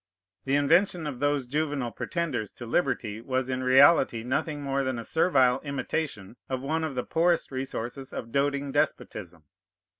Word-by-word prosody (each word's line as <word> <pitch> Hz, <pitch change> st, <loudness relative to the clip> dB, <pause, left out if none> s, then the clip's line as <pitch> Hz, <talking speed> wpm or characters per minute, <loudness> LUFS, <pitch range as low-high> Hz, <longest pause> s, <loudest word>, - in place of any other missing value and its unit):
The 135 Hz, +1 st, +1 dB
invention 165 Hz, +4 st, +3 dB
of 140 Hz, -5 st, -5 dB
those 145 Hz, -1 st, +1 dB
juvenile 145 Hz, -2 st, -2 dB
pretenders 145 Hz, -, -3 dB
to 120 Hz, -, -9 dB
liberty 115 Hz, -5 st, -1 dB
was 130 Hz, +1 st, -2 dB
in 130 Hz, 0 st, -1 dB
reality 130 Hz, -2 st, +5 dB
nothing 145 Hz, +3 st, -2 dB
more 140 Hz, 0 st, 0 dB
than 130 Hz, -2 st, -2 dB
a 115 Hz, -, -6 dB
servile 135 Hz, -7 st, +3 dB
imitation 140 Hz, -7 st, -4 dB
of 130 Hz, -1 st, -3 dB
one 160 Hz, +3 st, -1 dB
of 155 Hz, -4 st, -3 dB
the 125 Hz, -, -1 dB
poorest 170 Hz, -1 st, +1 dB
resources 130 Hz, 0 st, -5 dB
of 115 Hz, -, -6 dB
doting 140 Hz, +1 st, 0 dB
despotism. 85 Hz, -, -2 dB
135 Hz, 155 wpm, -27 LUFS, 125-150 Hz, -, reality